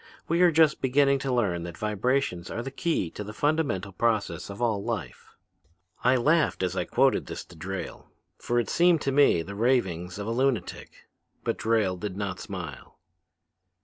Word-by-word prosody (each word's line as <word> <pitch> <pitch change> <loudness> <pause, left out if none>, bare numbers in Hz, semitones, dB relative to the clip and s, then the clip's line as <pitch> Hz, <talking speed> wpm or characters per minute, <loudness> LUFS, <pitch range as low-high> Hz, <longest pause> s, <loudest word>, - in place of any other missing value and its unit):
We 170 +2 +1
are 175 -1 +6
just 160 -1 +4
beginning 140 +1 +3
to 135 0 -2
learn 100 -9 +1
that 85 0 -7
vibrations 105 -3 -1
are 115 - -4
the 135 - -6
key 135 - -1
to 105 - -6
the 105 +1 -8
fundamental 145 - 0
process 105 -5 -1
of 100 - -8
all 110 -4 0
life.' - - -5 0.7
"I 125 +2 +4
laughed 150 - +2
as 90 0 -1
I 90 -2 -1
quoted - - +2
this - - -6
to 85 - -16
Drayle, 95 +3 -6 0.3
for 120 - -1
it 120 - -1
seemed 175 -2 +4
to 135 - 0
me 135 -12 +4
the 100 - -8
ravings 95 -7 0
of 100 - -4
a 115 - -2
lunatic. 130 0 -2 0.4
But - - -2
Drayle 110 -5 +1
did 95 0 -5
not 100 -3 -3
smile. - - -8
115 Hz, 180 wpm, -27 LUFS, 95-135 Hz, 0.7 s, are